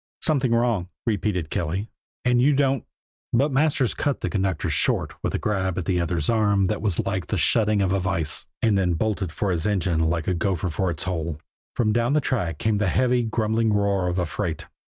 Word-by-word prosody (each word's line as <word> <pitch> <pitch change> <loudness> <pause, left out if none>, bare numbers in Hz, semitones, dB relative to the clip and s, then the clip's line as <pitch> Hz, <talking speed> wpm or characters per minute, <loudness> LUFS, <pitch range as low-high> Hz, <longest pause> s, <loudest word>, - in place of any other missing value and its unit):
"Something 140 -6 +2
wrong," 115 -6 +1 0.2
repeated 100 -7 -1
Kelly, 90 +6 -2 0.3
"and 125 0 +3
you 140 +2 +4
don't 135 -2 +1 0.3
" - - -52
But 140 +5 +3
Masters 135 -2 +2
cut 145 -2 -1
the - - -2
conductor 95 -5 -1
short - - +1
with - - -2
a - - +2
grab 95 -4 -1
at 90 - -2
the 90 0 +1
other's 85 -3 -1
arm 105 -3 +3
that 105 +2 -1
was 100 -6 0
like - - -2
the - - -1
shutting 105 -2 +3
of 95 -1 +1
a 100 - +1
vise 85 -5 -1 0.2
and 110 -3 +4
then 90 -3 +1
bolted 95 -1 -1
for 95 +5 -1
his 85 +2 -1
engine 90 -5 0
like 80 0 0
a 95 - +2
gopher 90 0 -1
for 95 +3 -1
its 80 -3 -4
hole. 85 -4 -3 0.4
From 110 -3 +1
down 120 +3 +1
the 150 - +4
track 95 - -1
came 110 +4 0
the 105 - +1
heavy, 125 +4 +2
grumbling 110 -1 0
roar 100 -3 +1
of 90 +1 -1
a 90 - +1
freight. 80 0 -3
100 Hz, 210 wpm, -24 LUFS, 90-115 Hz, 0.4 s, you